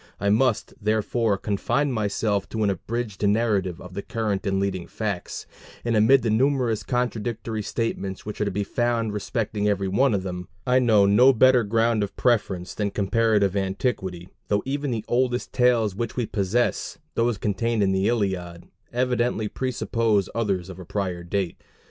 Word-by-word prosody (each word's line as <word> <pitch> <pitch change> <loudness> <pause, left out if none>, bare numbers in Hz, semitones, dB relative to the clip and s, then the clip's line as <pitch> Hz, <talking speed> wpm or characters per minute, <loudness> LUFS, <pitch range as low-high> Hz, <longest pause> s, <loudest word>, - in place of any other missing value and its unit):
I 100 - +1
must, 115 +2 +2
therefore, 110 0 +1
confine 110 +9 0
myself 105 -2 -1
to 110 -1 -2
an 100 - +3
abridged 110 +3 -4
narrative 100 -5 +1
of 90 0 -11
the 100 - -4
current 105 -2 -2
and 95 0 +1
leading 95 -3 -2
facts; 100 -5 -4 0.4
and 120 -1 +1
amid 115 +4 +5
the 115 - +1
numerous 125 -2 +2
contradictory 115 -1 -2
statements 100 -3 -3
which 105 0 -5
are - - +2
to - - 0
be 100 +1 -1
found 115 0 0
respecting 105 0 -2
every 100 -2 +1
one 115 +5 +3
of 95 - -2
them, 90 -1 -5 0.2
I 125 0 +4
know 110 -5 +5
no 120 +7 +6
better 130 0 +5
ground 115 +1 +2
of 100 - -3
preference 100 -7 0
than 105 -1 -1
comparative 105 -1 +2
antiquity, 95 -3 -2 0.2
though 105 0 +1
even 140 +1 -2
the 115 -3 -3
oldest 125 0 0
tales 120 -5 +3
which 115 +3 -4
we 120 - 0
possess 105 +4 -1 0.2
those 115 -1 +1
contained 105 +2 0
in 95 - +2
the 95 +1 +1
Iliad 90 -6 -2 0.3
evidently 120 -2 0
presuppose 115 -5 0
others 100 -6 -1
of 95 -1 -9
prior 90 -4 -3
date. 90 0 -2
105 Hz, 165 wpm, -24 LUFS, 100-120 Hz, 0.4 s, no